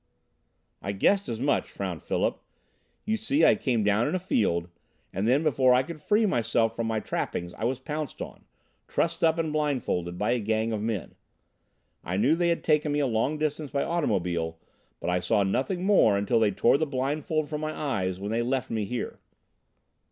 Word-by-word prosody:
"I 100 - -3
guessed 195 - +2
as 115 - -3
much," 140 +3 +1
frowned 90 -5 -5
Philip. - - -1 0.6
"You 220 +1 0
see, 275 +8 +2
I - - +7
came 120 -5 0
down 105 +3 +2
in - - -1
a - - 0
field, 95 - 0 0.5
and 95 +4 -1
then 135 +6 +3
before 130 -4 +4
I 130 - +3
could 155 +1 -8
free 210 +7 +3
myself 115 - +1
from 115 -1 -2
my 110 -1 0
trappings 85 -4 -3
I 110 - -4
was 130 +2 0
pounced 150 +1 -5
on - - -8 0.4
trussed 165 0 -1
up 160 0 +4
and 160 -2 -1
blindfolded 125 - -1
by 105 +4 0
a 125 - +1
gang 110 +1 0
of 105 - -2
men. 110 -5 -3 0.9
I 90 +2 -2
knew 130 +9 +4
they 170 0 +1
had 170 - 0
taken 150 -1 +2
me 145 - +1
a 145 - +2
long 125 +5 0
distance 150 -1 -2
by 140 0 0
automobile, 85 - -1 0.4
but - - -2
I 90 - +2
saw 100 +4 +2
nothing 135 - -1
more 185 - +5
until 100 +3 +2
they 110 -2 +4
tore 115 +7 +3
the 160 - 0
blindfold 145 +3 -1
from 150 0 -4
my 155 0 -2
eyes 95 -13 -2
when 100 +2 -4
they 115 +1 +1
left 130 +1 -1
me 110 -2 -1
here." 120 +4 -4
125 Hz, 195 wpm, -27 LUFS, 105-155 Hz, 0.9 s, I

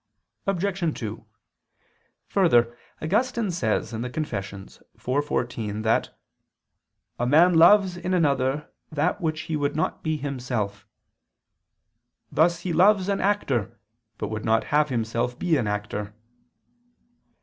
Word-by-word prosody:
Obj. 190 -3 -1
2: 110 -1 -6 1.0
Further, 120 -12 +3 0.3
Augustine 215 +4 0
says 115 -8 -1
(Confess. 110 -5 -5
iv, 140 +3 -1
14) 110 -6 -2
that 110 0 0 1.0
"a 120 - 0
man 165 +7 +5
loves 185 +2 +6
in 180 +1 -4
another 145 -4 +1 0.2
that 155 +6 0
which 160 -2 -1
he 160 0 -3
would 145 -1 -1
not 155 - -1
be 155 -1 -1
himself: 125 -8 -4 1.4
thus 170 +2 +2
he 175 -1 -2
loves 195 +3 +4
an 200 - 0
actor, 145 - 0 0.4
but - - -4
would 110 0 -4
not 110 0 +1 0.2
himself 120 -1 -2
be 175 -3 +1
an 125 -7 0
actor." 105 0 -4
145 Hz, 115 wpm, -25 LUFS, 115-175 Hz, 1.4 s, loves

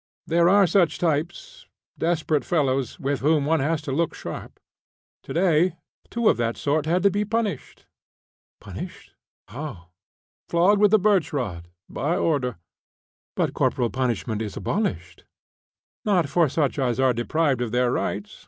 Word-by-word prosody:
There 170 +1 +3
are 200 +1 +6
such 180 -2 +2
types 165 0 -2 0.3
desperate 160 -3 0
fellows, 135 -7 0
with 140 -1 -1
whom 150 0 +2
one 160 +2 +2
has 155 +3 -1
to 140 - -4
look 165 +4 0
sharp. - - -8 0.6
To - - -10
day 170 0 +2 0.3
two 235 -1 0
of - - +4
that 115 -1 -1
sort 150 +1 0
had 175 +3 +1
to 200 - +5
be 205 +2 0
punished." 215 0 -3 0.7
"Punished? - - -9 0.4
How?" 115 - -8 0.6
"Flogged 190 +5 +3
with 210 0 +6
a - - +7
birch 200 -4 +2
rod, 90 - -4 0.2
by 160 +5 -2
order." 125 - 0 0.8
"But - - 0
corporal 120 -2 0
punishment 120 -4 -2
is 105 -3 -5
abolished." 90 - -3 0.8
"Not 185 -7 +2
for 165 0 +3
such 145 0 0
as 125 -2 0
are 130 -1 +3
deprived 135 +2 0
of 120 -3 -2
their 125 0 +2
rights. 205 +10 -3
155 Hz, 150 wpm, -24 LUFS, 125-175 Hz, 0.8 s, a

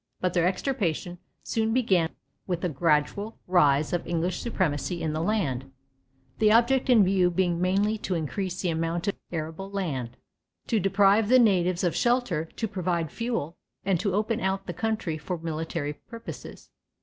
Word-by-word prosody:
But 185 -1 0
their 175 -1 +3
extirpation 185 - -2 0.2
soon 225 0 0
began 190 -10 +2 0.4
with 175 -2 -2
the 180 - 0
gradual 165 - 0
rise 150 -5 +3
of 175 - -1
English 170 +1 -1
supremacy 180 -6 -1
in 155 -1 -1
the 155 - -1
land, 140 - -1 0.7
the 215 -1 +5
object 240 +4 +3
in 230 -5 +7
view 185 -1 +3
being 175 -1 0
mainly 200 +4 +1
to 190 -3 -2
increase 180 +4 -3
the 175 - +1
amount 165 +3 -2
or - - 0 0.2
arable 165 +3 -4
land, 145 -12 -3 0.5
to 225 - +1
deprive 200 +2 +3
the 255 - +7
natives 185 -6 +3
of 175 - +1
shelter, 240 -10 +1
to 225 +7 -4
provide 175 -5 -2
fuel, 230 -9 -3 0.3
and 190 -3 +2
to 195 0 0
open 215 +2 0
out 190 +1 -1
the 175 - -5
country 215 -8 -2
for 175 +4 -4
military 160 -2 -3
purposes. 230 +8 -10
185 Hz, 160 wpm, -27 LUFS, 165-210 Hz, 0.7 s, in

